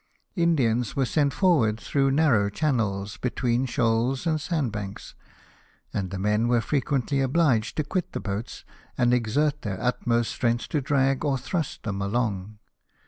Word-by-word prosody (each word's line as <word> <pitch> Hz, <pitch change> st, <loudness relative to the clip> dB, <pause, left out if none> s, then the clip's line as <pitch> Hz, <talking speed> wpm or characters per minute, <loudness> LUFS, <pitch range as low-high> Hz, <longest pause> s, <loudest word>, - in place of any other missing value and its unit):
Indians 125 Hz, -, +1 dB
were 135 Hz, -, +2 dB
sent 145 Hz, +2 st, +1 dB
forward 130 Hz, -, +2 dB
through 135 Hz, +1 st, +1 dB
narrow 135 Hz, -8 st, +3 dB
channels 105 Hz, -6 st, -1 dB
between 125 Hz, 0 st, 0 dB
shoals 120 Hz, +3 st, 0 dB
and 155 Hz, -2 st, 0 dB
sandbanks; 120 Hz, -, -3 dB, 0.8 s
and 95 Hz, -2 st, -2 dB
the 95 Hz, -, -5 dB
men 105 Hz, +4 st, +1 dB
were 120 Hz, 0 st, +3 dB
frequently 135 Hz, +2 st, 0 dB
obliged 130 Hz, -5 st, +1 dB
to 155 Hz, -, +1 dB
quit 175 Hz, +5 st, -3 dB
the -, -, -4 dB
boats, 100 Hz, +3 st, -5 dB, 0.3 s
and 120 Hz, -1 st, +3 dB
exert 140 Hz, +6 st, +1 dB
their 95 Hz, -3 st, -4 dB
utmost 120 Hz, -1 st, 0 dB
strength 120 Hz, -2 st, -1 dB
to 150 Hz, -, 0 dB
drag 135 Hz, 0 st, +1 dB
or 140 Hz, -3 st, +1 dB
thrust 160 Hz, +3 st, -3 dB
them 100 Hz, -3 st, -3 dB
along. 105 Hz, -1 st, -2 dB
125 Hz, 145 wpm, -25 LUFS, 110-145 Hz, 0.8 s, narrow